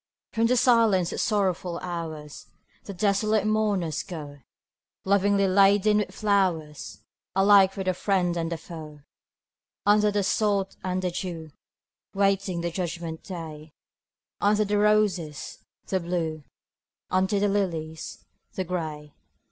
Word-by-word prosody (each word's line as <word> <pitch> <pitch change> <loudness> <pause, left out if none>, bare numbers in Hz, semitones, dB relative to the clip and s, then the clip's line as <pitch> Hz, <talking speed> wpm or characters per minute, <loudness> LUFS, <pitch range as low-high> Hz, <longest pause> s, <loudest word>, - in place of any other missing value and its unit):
From 230 0 +2
the 250 +1 +2
silence 225 -8 +3
of - - -2
sorrowful 185 -5 0
hours 160 -4 -6 0.4
The 200 - -6
desolate 210 +2 +1
mourners 205 -7 0
go, 145 -5 -8 0.7
Lovingly 200 0 +3
laden 200 +2 +4
with 210 - -2
flowers 185 -8 -1 0.3
Alike 195 0 +6
for 195 - -4
the 185 0 +1
friend 180 -2 0
and 165 -1 -2
the 170 - -2
foe: 155 -3 -10 0.8
Under 210 0 +4
the 205 -1 0
sod 200 -1 0
and 185 0 -2
the 180 - 0
dew, 170 -3 -5 0.6
Waiting 195 -3 +1
the 170 0 -2
judgment 170 -2 -4
day; 155 -4 -8 0.7
Under 210 +1 +3
the 205 0 +1
roses, 205 -8 +1 0.3
the 190 - -1
Blue, 165 -4 -3 0.7
Under 190 +2 +2
the 205 - +2
lilies, 165 -6 -3 0.3
the 190 - -1
Gray. 155 -4 -5
185 Hz, 125 wpm, -26 LUFS, 165-205 Hz, 0.8 s, Alike